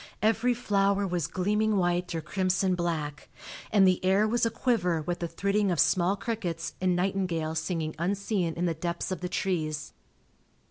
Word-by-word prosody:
Every 225 +3 +3
flower 200 -3 +1
was 175 -3 -1
gleaming 210 +3 +1
white 175 -1 0
or 165 - -2
crimson 185 +3 0
black, 160 -4 -3 0.4
and 200 -3 +5
the 185 -1 +3
air 195 +3 +3
was 235 +1 +2
aquiver 205 -8 0
with 175 +3 -3
the 170 - -2
thridding 200 +4 0
of 175 -4 0
small 180 +6 +3
crickets 185 -7 -3
and 185 -1 +2
nightingales 175 -4 -1
singing 160 -2 -3
unseen 190 -1 -1
in 175 - -1
the 170 - +1
depths 170 +3 -3
of 185 - -3
the 180 - -3
trees. 155 -5 -2
180 Hz, 165 wpm, -28 LUFS, 170-200 Hz, 0.4 s, and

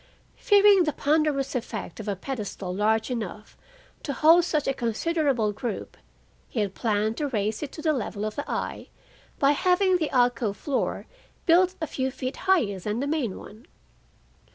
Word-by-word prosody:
Fearing 405 -4 +5
the 305 - -1
ponderous 290 -2 +1
effect 225 -7 -5
of 215 - -7
a 200 - -1
pedestal 205 -4 -5
large 220 +4 +1
enough 215 -2 -5 0.5
to 280 - -3
hold 325 +5 +6
such 305 -4 -1
a 270 - +2
considerable 255 -1 0
group, 220 +1 -5 0.5
he 235 - -3
had 200 -2 -1
planned 215 0 0
to 295 - -1
raise 215 -4 -2
it 295 - -5
to 310 - -8
the 310 - +3
level 215 -5 -3
of 215 - -4
the 285 - -5
eye - - -4 0.5
by 280 -1 +4
having 365 +4 +3
the 315 -4 -1
alcove 245 -4 +1
floor 280 -3 -2 0.4
built 360 +2 +4
a 320 - -1
few 265 -3 -2
feet 255 0 -5
higher 215 - +3
than 210 +5 -3
the 275 - -1
main 285 -9 -1
one. 220 +8 -13
260 Hz, 170 wpm, -26 LUFS, 215-310 Hz, 0.5 s, hold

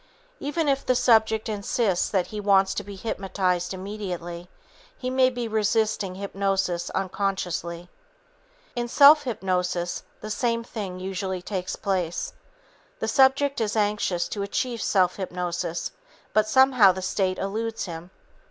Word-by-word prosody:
Even 295 +2 -1
if 275 -1 +1
the 255 - +2
subject 220 -2 +3
insists 205 -2 0
that 190 -3 +1
he 210 - -3
wants 195 -1 +3
to 205 - -3
be 200 0 -9
hypnotized 190 -3 -1
immediately, 185 -3 -6 0.5
he 255 0 -3
may 260 0 +4
be 245 -2 -4
resisting 215 -3 0
hypnosis 195 -3 -1
unconsciously. 180 -3 -2 0.9
In 240 0 -1
self 290 +4 +7
hypnosis 180 -6 -1 0.2
the 215 - -5
same 230 0 0
thing 200 -6 -6
usually 190 -1 -3
takes 185 -2 -3
place. 180 -4 -2 0.6
The - - -3
subject 270 0 +3
is 215 -1 -1
anxious 205 -5 0
to 205 - -4
achieve 235 +3 -2
self 185 -3 +2
hypnosis, 175 -2 -3 0.4
but 215 0 +3
somehow 255 -4 +6
the 185 0 -6
state 185 0 0
eludes 220 +3 -3
him. 170 -1 -8
200 Hz, 135 wpm, -25 LUFS, 185-230 Hz, 0.9 s, self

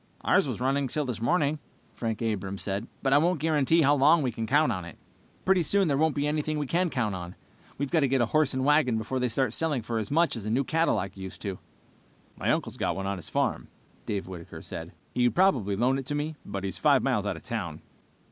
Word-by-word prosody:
"Ours - - +3
was - - -3
still 125 - -3
running 135 +1 +1
this 125 -5 -3
morning," 150 +2 +1 0.3
Frank 115 -1 -3
Abrams 100 -3 -2
said, 100 +3 -3 0.2
"but 135 -1 +2
I 145 - +7
won't 175 +1 +1
guarantee 155 +1 +3
how 145 +1 +5
long 150 +3 +5
we 125 - 0
can 115 0 -4
count 145 +1 +3
on 95 -4 -3
it." 85 - -10 0.5
"Pretty 190 -1 +4
soon 195 +4 +2
there 140 - +2
won't 155 +2 +2
be 145 0 0
any 150 +1 +1
we 150 -1 -1
can 175 +6 +1
count 115 -8 -1
on. 90 -1 -6 0.4
We've 140 -1 -3
got 170 - +4
to 140 - +3
get 135 0 +1
a 120 - +3
horse 150 +2 +1
and 130 0 0
wagon 145 -5 +3
before 115 +4 -2
they 125 - +1
start 120 -1 0
selling 150 -6 0
for 115 0 -2
as 105 - -4
much 165 +1 +2
as 115 - -5
a 105 - -3
new 125 +5 +2
Cadillac 155 - 0
used 95 0 -8
to." 100 -3 -4 0.8
"My - - -2
uncle's - - -1
got - - -1
one 95 - -4
on 100 -1 -2
his 80 - -7
farm," - - -1 0.3
said - - -32
Dave 100 -3 -2
Whitaker. 90 -3 -9 0.5
"He 125 -1 +3
would - - -2
probably 130 - +3
loan 125 +6 +2
it 135 - -7
to 145 - -1
me, 150 +2 -2
but 100 -1 -5
he's 95 -2 -4
five - - +4
miles - - +1
out - - -1
of - - -12
town." - - -5
130 Hz, 245 wpm, -27 LUFS, 110-150 Hz, 0.8 s, I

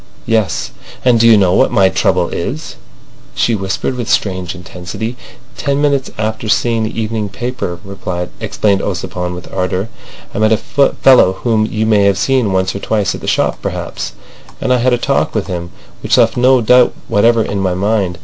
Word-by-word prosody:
"Yes." 110 -3 0 0.3
"And 120 -2 +4
do 115 - +5
you 115 -2 +7
know 95 -3 +3
what 130 - +3
my 100 -5 +4
trouble 90 -2 +1
is?" 140 - -5 0.6
she 120 - +1
whispered 95 +5 -2
with 120 -2 -4
strange 95 -3 -1
intensity. 90 +6 -6 0.4
"Ten 140 -1 -1
minutes 140 -2 +1
after 110 0 -3
seeing 115 +2 +1
the 110 - -4
evening 110 -1 -2
paper," 115 -3 -4 0.6
explained 100 -2 0
Ossipon 90 -2 -3
with 90 - -10
ardour, 95 +3 -2 0.4
"I - - -3
met 110 +1 +4
a - - +3
fellow 135 -7 +3
whom 110 +1 0
you 110 -1 -1
may 105 -2 +3
have 100 -1 +3
seen 130 -5 +1
once 95 0 0
or 100 - -5
twice 105 -1 0
at - - -7
the - - -7
shop - - 0
perhaps, - - -5 0.5
and 130 - +1
I - - +3
had 125 +1 +2
a 120 - +3
talk 135 +1 0
with 110 - 0
him 85 -2 -5 0.3
which - - +1
left - - +4
no 125 +1 +4
doubt 125 +2 +4
whatever 115 +2 +3
in 100 - -3
my 95 -2 0
mind. 100 -2 0
110 Hz, 185 wpm, -15 LUFS, 95-120 Hz, 0.6 s, you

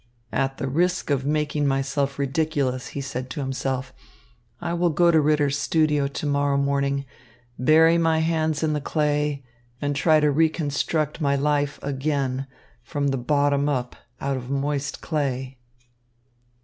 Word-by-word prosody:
"At 135 0 -1
the 135 - -3
risk 175 +4 0
of 135 -1 0
making 150 -1 0
myself 135 0 0
ridiculous," 140 -2 -1
he - - -1
said 130 -1 -5
to 125 - -5
himself, 130 -1 -3 0.7
"I 170 0 -3
will 175 0 +2
go 170 +2 +4
to 160 -2 +4
Ritter's 145 -1 +2
studio 150 -3 +2
to 140 +2 -5
morrow 140 -1 +1
morning, 140 0 0 0.5
bury 160 +5 +5
my 165 -1 +2
hands 160 -1 0
in 155 -1 +1
the 150 - -1
clay, 150 -2 0 0.3
and 145 0 -1
try 155 +2 +4
to 150 -1 +3
reconstruct 155 0 0
my 140 -1 +2
life 145 0 0
again 135 -1 -1 0.3
from 140 +4 -2
the 135 - 0
bottom 140 +2 +1
up 125 -3 -2 0.2
out 140 -1 -1
of 125 0 -7
moist 140 0 -2
clay." 135 -4 -2
145 Hz, 150 wpm, -24 LUFS, 135-155 Hz, 0.7 s, bury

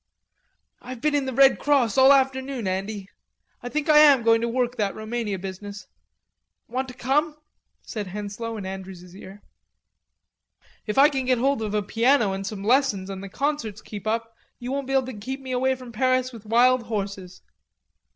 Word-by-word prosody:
"I've 255 -1 -8
been 300 +4 0
in 285 -2 +1
the - - -2
Red 270 +2 +5
Cross 270 -7 +2
all 265 +1 +7
afternoon, 265 -2 +1
Andy.... 195 +1 -3 0.5
I 245 - -6
think 300 +3 -2
I 305 -1 +7
am 285 -5 +6
going 225 0 +4
to 235 - 0
work 245 +1 -1
that 205 -3 -1
Roumania 215 -2 -3
business.... 195 +2 -8 0.8
Want 260 +3 -3
to 250 - -10
come?" 295 +5 0 0.5
said 210 -4 -6
Henslowe 210 +4 -5
in 200 - -6
Andrews' 190 -1 -8
ear. 195 +1 -12 1.4
"If 210 - -3
I 280 +2 +8
can 270 -3 -2
get 255 0 +2
hold 270 +1 +1
of 215 -1 -3
a 210 - 0
piano 230 0 +2
and 195 0 -4
some 200 -2 -6
lessons 215 -5 +1
and 190 0 -7
the 195 - -7
concerts 250 -4 -3
keep 205 -1 -8
up 225 +1 -2 0.2
you 245 +1 -6
won't 275 -1 -3
be 270 - -3
able 265 -1 +2
to 260 - -7
get 255 +6 -6
me 260 -1 -8
away 260 +1 +1
from 250 -2 -11
Paris 255 +2 0
with 220 -2 -12
wild 250 +3 +4
horses. 195 -4 -5
235 Hz, 185 wpm, -24 LUFS, 205-265 Hz, 1.4 s, I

